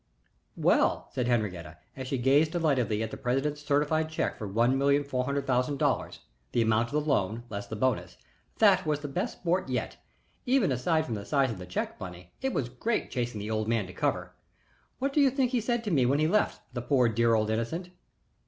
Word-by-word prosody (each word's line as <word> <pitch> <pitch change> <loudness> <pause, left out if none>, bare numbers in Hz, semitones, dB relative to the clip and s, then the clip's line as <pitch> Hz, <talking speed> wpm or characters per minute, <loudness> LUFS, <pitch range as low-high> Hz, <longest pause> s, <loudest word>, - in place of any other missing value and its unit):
"Well," - - +2
said 125 -2 -1
Henriette, 90 - -2 0.2
as 130 -1 -6
she 135 - -1
gazed 140 +5 +3
delightedly 130 -10 +1
at 110 - -4
the - - -6
president's 135 +4 -1
certified 150 +2 +1
check 160 - -1
for 105 - -6
one 115 +6 +2
million 140 +1 +3
four 130 -3 -2
hundred 140 +1 -1
thousand 130 +2 +1
dollars - - -1 0.3
the 120 - +3
amount 110 +1 +2
of 140 - -12
the 150 0 0
loan 115 -4 0
less 100 -1 -5
the 110 - -5
bonus 105 -7 -1 0.4
"that 195 -4 +5
was 150 -1 0
the 145 - -4
best 145 +6 -2
sport 180 +1 0
yet. - - -2 0.5
Even 250 - +3
aside 155 +6 +1
from 120 - -4
the 105 -2 -4
size 135 +1 +1
of 105 - -7
the 90 - -8
check, 90 - -3
Bunny, 90 -2 -9
it 265 0 0
was 135 - -1
great 215 - -2
chasing 120 -4 -2
the 105 +2 -4
old 110 0 -1
man 115 -3 +1
to 90 - -10
cover. - - -1 0.6
What 275 +1 -1
do 295 - +4
you 275 - +6
think 260 -1 0
he 245 -3 +1
said 235 +1 -1
to 210 - -2
me 130 -6 +3
when 140 +3 +3
he 155 +1 +2
left, 210 +5 +1
the 120 - -3
poor, 125 0 +3
dear 115 0 +3
old 110 0 +1
innocent?" 160 +12 -3
130 Hz, 220 wpm, -28 LUFS, 110-155 Hz, 0.6 s, you